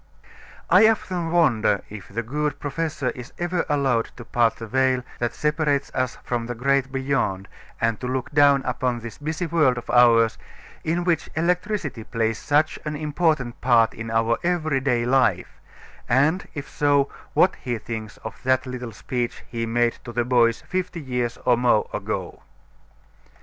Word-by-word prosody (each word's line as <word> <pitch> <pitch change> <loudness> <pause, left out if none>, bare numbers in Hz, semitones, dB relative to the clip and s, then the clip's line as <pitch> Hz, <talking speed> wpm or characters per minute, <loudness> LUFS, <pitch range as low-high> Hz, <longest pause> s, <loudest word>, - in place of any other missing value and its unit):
I 220 - +8
often 180 -6 0
wonder 115 - +2
if 105 -2 -10
the 115 +4 -4
good 150 +5 -2
professor 145 -2 -2
is 120 -1 -10
ever 175 0 -1
allowed 135 -6 +2
to 120 - -9
part 120 -2 +2
the 115 - -7
veil 130 +2 +1 0.2
that 120 -1 -2
separates 150 -2 0
us 130 -2 -1
from 120 -2 -2
the 120 - -4
great 135 +2 +1
beyond 130 -8 -1 0.3
and 115 -1 0
to 125 - -4
look 130 +1 -3
down 145 -2 +5
upon 125 -2 -1
this 115 -1 -9
busy 160 +4 -3
world 155 -7 +2
of 120 - -7
ours 115 -2 +5 0.4
in 170 +2 0
which 170 -3 0
electricity 170 - -1
plays 115 -1 -1
such 150 +2 +1
an 150 0 -3
important 150 -4 0
part 120 -3 +4
in 115 0 -7
our 115 +1 +1
every 160 -5 +1
day 125 -3 +1
life; 120 -8 +1 0.5
and 145 +9 +2
if 140 -1 -5
so, 145 -1 +2 0.3
what - - +4
he 120 -2 -3
thinks 110 0 -7
of - - -7
that 130 0 +1
little 125 -2 -6
speech 120 +2 -4
he 115 -1 -3
made 120 +1 +1
to 120 - -7
the 120 0 0
boys 120 -2 +3
fifty 180 -1 -3
years 125 -4 -2
or 125 - +5
more 120 -3 +3
ago. - - -4
130 Hz, 165 wpm, -23 LUFS, 120-150 Hz, 0.5 s, I